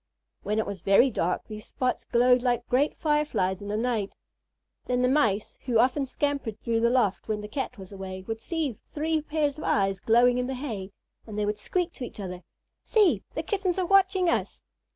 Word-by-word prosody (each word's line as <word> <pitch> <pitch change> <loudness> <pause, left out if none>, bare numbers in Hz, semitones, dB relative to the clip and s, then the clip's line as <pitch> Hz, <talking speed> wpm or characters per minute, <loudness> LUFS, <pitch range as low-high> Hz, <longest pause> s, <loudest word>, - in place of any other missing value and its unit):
When 210 +1 -2
it 220 - +1
was 200 -3 -6
very 200 +8 +5
dark, 180 -3 -1
these 215 -1 -9
spots 255 -1 -2
glowed 250 +1 +4
like 240 -1 0
great 275 +4 +1
Fireflies 265 - 0
in 200 - -7
the 210 +1 -1
night. 225 -4 -1 0.7
Then 250 0 +1
the - - +4
Mice, 225 -7 +1
who 245 -3 +2
often 265 +4 +2
scampered 275 -6 -2
through 230 -1 0
the 235 +1 +3
loft 240 -6 +1
when 215 -1 -2
the 210 - -6
Cat 250 +2 -4
was 190 -1 -11
away, 190 -1 -7
would 225 +2 -5
see 320 -6 -2
three 310 +8 -2
pairs 300 -1 -1
of - - -6
eyes 195 -1 +1
glowing 245 +3 +4
in 250 - -1
the 265 - -3
hay, 225 -8 -5 0.4
and 210 -2 -7
they 210 - +1
would 210 0 -2
squeak 355 - -1
to 260 - -8
each 235 - -8
other: 180 -2 -6 0.4
"See! 420 -5 +3
The - - -2
Kittens 385 -4 -1
are 370 - +1
watching 380 -1 +4
us." 335 - -1
245 Hz, 205 wpm, -27 LUFS, 210-290 Hz, 0.7 s, very